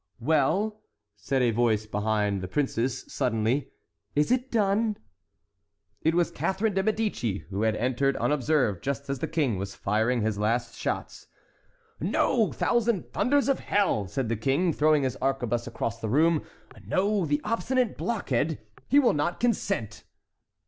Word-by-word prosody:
"Well," 200 - +1 0.3
said 125 +6 0
a 120 - +3
voice 110 -2 +1
behind 105 -2 0
the 95 - -4
princes, 130 +1 -1
suddenly, 120 +4 0 0.5
"is 150 +6 +2
it 255 +1 +1
done?" 215 0 +1 1.0
It 160 +1 +2
was 175 -1 +2
Catharine 200 +4 -1
de 195 - +2
Médicis, 205 - -1
who 100 +2 -2
had 110 -1 +2
entered 130 +4 +1
unobserved 135 - +1
just 140 0 -3
as 135 - -3
the - - -2
King 140 - 0
was 100 0 -5
firing 110 +4 +1
his 105 -2 -1
last 115 +3 0
shot. - - -4 0.7
"No, 230 -5 +1
thousand 235 -5 0
thunders 275 +7 +2
of 275 - +2
hell!" 190 - +1
said 130 +5 -2
the 115 - 0
King, 140 - +1
throwing 150 -1 +3
his 130 -2 -1
arquebuse 120 -3 -1
across 115 0 -4
the 110 - -2
room. 155 +5 +3 0.4
"No, 200 +1 +1
the 145 0 +1
obstinate 240 +2 0
blockhead—he 145 - -1
will 260 - +4
not 150 +4 -1
consent!" 195 - -1
140 Hz, 145 wpm, -27 LUFS, -, 1.0 s, will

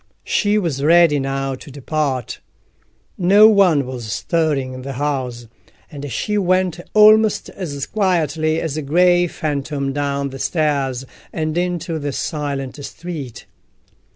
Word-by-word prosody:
She 205 0 +1
was 160 -9 -1
ready 165 -1 +5
now 135 0 -2
to 130 +3 -10
depart. 140 -2 -3 0.8
No 200 +4 +7
one 185 -10 +4
was 125 -4 -6
stirring 150 - -1
in 130 - -8
the 135 +1 -6
house, 130 -3 -3 0.5
and 145 -2 -7
she 210 - -1
went 185 -2 +1 0.2
almost 215 0 +5
as 145 -7 -5
quietly 160 -6 0
as 160 -4 -3
a - - -1
grey 175 +4 +3
phantom 140 -3 -3
down 140 -1 -2
the 135 - -8
stairs 140 -6 -1 0.3
and 155 -1 -3
into 175 -2 -2
the 145 -1 -4
silent 140 -2 -4
street. 155 -7 -7
150 Hz, 130 wpm, -19 LUFS, 135-175 Hz, 0.8 s, No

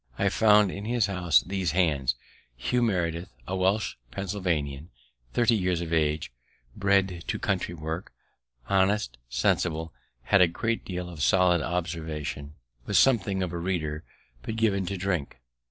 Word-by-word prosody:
I 100 - +2
found 105 -1 +5
in 100 +3 -6
his 120 -1 +2
house 90 -5 +3
these 95 -4 -2
hands: 70 -9 +2 0.4
Hugh 125 - 0
Meredith, 90 -6 0 0.2
a 95 - -2
Welsh 95 - +1
Pennsylvanian, 85 -6 -2 0.4
thirty 120 0 +3
years 90 -4 0
of 85 -1 -4
age, 75 -3 +1 0.4
bred 95 -3 +1
to - - -1
country 85 - -1
work; 80 +2 -5 0.6
honest, 95 - +1
sensible, 80 +6 0 0.3
had 95 +9 +4
a 90 - +7
great 115 +7 -2
deal 90 -1 -5
of 85 -4 -8
solid 90 0 +4
observation, 80 -4 -4 0.3
was - - +2
something 100 -7 +3
of 90 -2 -4
a 85 - -3
reader, 85 -4 -2 0.4
but 110 - -5
given 100 -5 +1
to 100 +1 -2
drink. 90 -9 -2
90 Hz, 145 wpm, -27 LUFS, 80-100 Hz, 0.6 s, a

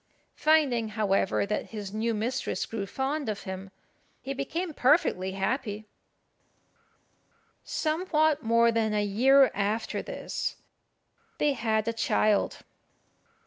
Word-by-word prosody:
Finding, 285 -8 +2
however, 195 -2 +1
that 210 +1 -2
his 205 -3 -7
new 225 +1 -1
mistress 245 +5 -2
grew 205 -3 -4
fond 270 +4 -2
of 210 -1 -4
him, 190 0 -6 0.5
he 270 - -5
became 315 +5 -3
perfectly 250 - +2
happy. 210 +1 -2 1.8
Somewhat 310 -2 +1
more 230 0 +4
than 220 -2 0
a 210 - +2
year 265 +7 +5
after 210 +3 -1
this - - -4 0.8
they 295 -1 +2
had 220 -3 0
a 230 - 0
child. 215 -2 +1
230 Hz, 110 wpm, -28 LUFS, 210-275 Hz, 1.8 s, year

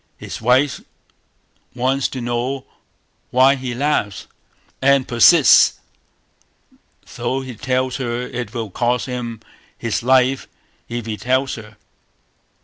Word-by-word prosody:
His - - -8
wife 130 +4 +2 0.9
wants 130 +2 0
to 130 - -6
know 120 +3 -2 0.6
why 130 +2 +5
he 130 -2 -5
laughs, 125 -7 -1 0.6
and 135 -1 +3
persists, 130 +5 +6 1.4
though 135 +1 -2
he 130 -1 -7
tells 130 +2 -1
her 120 -1 -3
it 125 -4 -5
will 115 -4 -5
cost 120 +3 0
him 120 -3 -5 0.4
his 115 -2 -2
life 130 +1 +2 0.4
if 120 -1 -4
he 110 -2 -4
tells 130 +3 0
her. 110 -1 -10
125 Hz, 115 wpm, -19 LUFS, 120-130 Hz, 1.4 s, persists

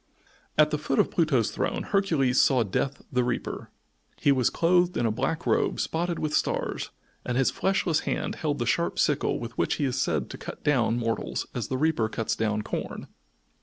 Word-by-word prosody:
At 150 0 +5
the 150 - 0
foot 140 -2 -1
of - - +3
Pluto's 145 - +2
throne - - -2
Hercules 160 -11 +2
saw 130 -3 +4
Death 130 +7 -2
the 125 -2 +2
Reaper. 120 -1 -3 0.5
He 140 - +4
was 130 -3 +3
clothed 175 +1 +2
in 120 - +1
a 115 - +2
black 135 +8 -2
robe - - +1
spotted 170 +1 -1
with 150 -1 -2
stars - - -1 0.3
and 125 - -2
his 135 - +3
fleshless 190 -4 +1
hand - - -2
held 150 -2 -1
the 120 - -1
sharp 170 +9 0
sickle 145 - +1
with 120 +1 -7
which - - +1
he 145 - -1
is 130 0 0
said - - 0
to - - -8
cut - - -8
down 120 -5 +2
mortals 115 -1 -2
as 120 -4 -3
the 130 - -2
reaper 150 -6 +1
cuts 110 0 -2
down 105 -1 -1
corn. - - -5
135 Hz, 195 wpm, -27 LUFS, 120-160 Hz, 0.5 s, At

